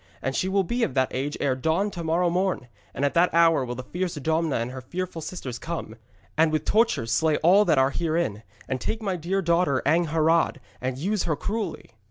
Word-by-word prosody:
And 135 +1 -3
she 185 - 0
will 195 0 +2
be 240 +8 -2
of 140 - 0
that 130 -1 +1
age 140 +3 -2
ere 135 -2 +1
dawn 160 +9 0
to 175 -3 -6
morrow 170 +2 +1
morn, 180 -7 0 0.2
and 140 - -1
at 140 - 0
the 175 +2 +4
hour 165 -4 +5
will 125 -1 -4
the 130 - -6
fierce 180 +5 -3
Domna 160 +1 0
and 115 +2 -2
her 130 0 -7
fearful 175 +5 -5
sisters 135 -8 -6
come, 165 -9 -5 0.4
and 160 0 +3
with 155 -1 -1
tortures 215 - +2
slay 155 +5 +2
all 195 +5 +6
that 150 - +3
are 135 +1 +4
herein, 160 -11 -1 0.3
and 130 -1 -3
take 225 0 -3
my 195 -3 -1
dear 185 +3 -1
daughter 170 -5 +2
Angharad, 165 +1 +2 0.2
and 130 0 -2
use 195 +7 -1
her 160 -3 0
cruelly.' 210 - -4
165 Hz, 215 wpm, -25 LUFS, 135-180 Hz, 0.4 s, all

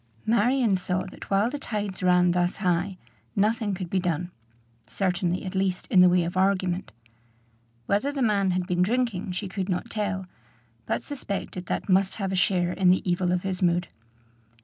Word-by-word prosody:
Marion 235 0 +3
saw 180 0 -1
that - - -11
while 200 +4 +2
the 290 - -4
tides 205 -7 -4
ran 180 -1 +4
thus 175 +1 +1
high, 180 0 0 0.4
nothing 210 0 +1
could 185 -1 -5
be 190 - +2
done; 175 0 -2 0.6
certainly, 180 - -1
at 185 - -5
least, 190 -1 -1
in 185 - +7
the 180 - +7
way 180 0 +3
of 170 +2 -4
argument. 185 -1 +1 0.9
Whether 210 +8 +1
the 275 -2 -1
man 200 -4 +2
had 180 0 0
been 180 0 0
drinking 215 -2 0
she 195 +3 -4
could 190 +1 -4
not 185 +6 -2
tell, 205 -3 -2 0.6
but - - -1
suspected 200 - -5
that - - -2
must 190 0 +2
have 195 -3 -3
a - - -1
share 180 -1 +2
in 185 -1 +3
the 185 +1 +2
evil 180 0 +1
of 180 -1 0
his 190 -1 -3
mood. 175 0 +2
185 Hz, 180 wpm, -26 LUFS, 180-205 Hz, 0.9 s, in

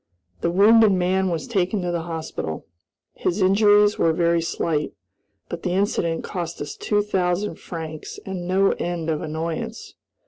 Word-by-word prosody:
The 170 - 0
wounded 210 +3 +6
man 185 +1 +1
was 165 -2 -2
taken 195 -4 0
to 175 - -1
the 170 -1 -1
hospital. 160 - -5 0.5
His 180 +4 -1
injuries 205 +2 +4
were 165 - +3
very 170 0 +2
slight, 160 -2 -1 0.5
but - - -6
the 180 - -1
incident 180 -4 0
cost 170 -2 -5
us 145 -1 -5
two 205 -1 0
thousand 185 -2 -1
francs 160 -2 -7
and 185 -2 -5
no 195 +2 +3
end 170 -2 -2
of 155 - -2
annoyance. 160 +1 -4
175 Hz, 150 wpm, -23 LUFS, 165-195 Hz, 0.5 s, wounded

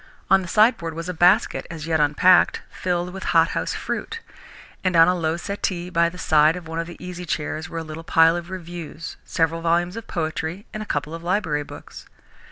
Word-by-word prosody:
On 195 0 +6
the 180 - -7
sideboard 190 -5 +3
was 165 +1 -5
a - - -2
basket, 175 +1 +3
as 160 -2 -7
yet 160 -1 +1
unpacked, 150 +5 +4
filled 180 0 -2
with 190 - -7 0.2
hothouse 165 +1 +1
fruit, 460 - -4 0.6
and 185 -2 +1
on 165 0 +7
a 180 - +4
low 165 -2 -1
settee 180 -1 -3
by 170 -1 +3
the 180 - -12
side 155 -1 +4
of 175 -3 -8
one 160 +1 -4
of 165 - -3
the 175 - -10
easy 180 0 -7
chairs 155 0 -3
were 165 - -6
a 165 - -3
little 155 +1 -8
pile 165 0 +4
of 175 0 -5
reviews, 170 -3 -7
several 165 -1 0
volumes 170 +2 +1
of 230 -1 -7
poetry, 160 +3 -3
and 215 - -4
a 215 - -7
couple 150 +2 -2
of 165 - -6
library 175 -4 0
books. - - -12
170 Hz, 205 wpm, -23 LUFS, 160-180 Hz, 0.6 s, on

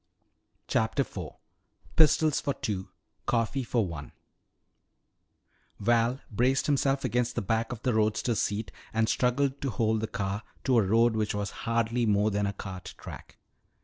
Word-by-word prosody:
CHAPTER 110 +5 +1
IV 90 - -5 0.6
PISTOLS 155 -1 +4
FOR 140 - -1
TWO 95 -3 -3 0.4
COFFEE 120 +3 +1
FOR 115 -2 +1
ONE 80 -4 -7 1.7
Val 120 +4 +2
braced 125 +5 +2
himself 140 -1 +2
against 125 0 0
the - - 0
back 115 +4 0
of 120 -2 -6
the 125 - +2
roadster's 110 +1 +1
seat 105 -2 -2 0.2
and 110 0 +3
struggled 135 +4 +1
to 140 - -1
hold 110 -2 +1
the 110 - -1
car 100 +1 -2 0.2
to 125 -3 +4
a 100 - +2
road 115 +2 +4
which 105 -1 0
was 105 -1 -2 0.2
hardly 115 +1 +1
more 105 +1 +3
than 100 0 0
a 100 - -2
cart 95 -2 -8
track. - - -10
115 Hz, 150 wpm, -29 LUFS, 105-125 Hz, 1.7 s, PISTOLS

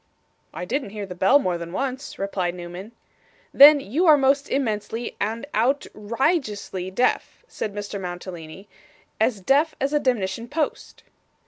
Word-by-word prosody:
'I - - -4
didn't 265 +2 -2
hear 205 0 -6
the 185 - -8
bell 190 +10 +4
more 180 -11 -1
than 170 0 -7
once,' 265 +5 -4
replied 185 -3 -2
Newman. 180 +5 -9 0.6
'Then 290 +1 +9
you 280 - 0
are 305 -2 +8
most 275 +1 +2
immensely 230 -2 -2
and 225 +5 -2
outr 255 +6 +1 0.3
i 330 +6 +4
geously 200 - -6
deaf,' 250 - 0
said 215 - -5
Mr 205 -1 -5
Mantalini, 175 0 -8 0.5
'as 215 -6 +1
deaf 285 - +2
as 275 +2 -1
a 295 - +3
demnition 230 -4 -1
post. 305 0 -3
220 Hz, 150 wpm, -23 LUFS, 190-275 Hz, 0.6 s, Then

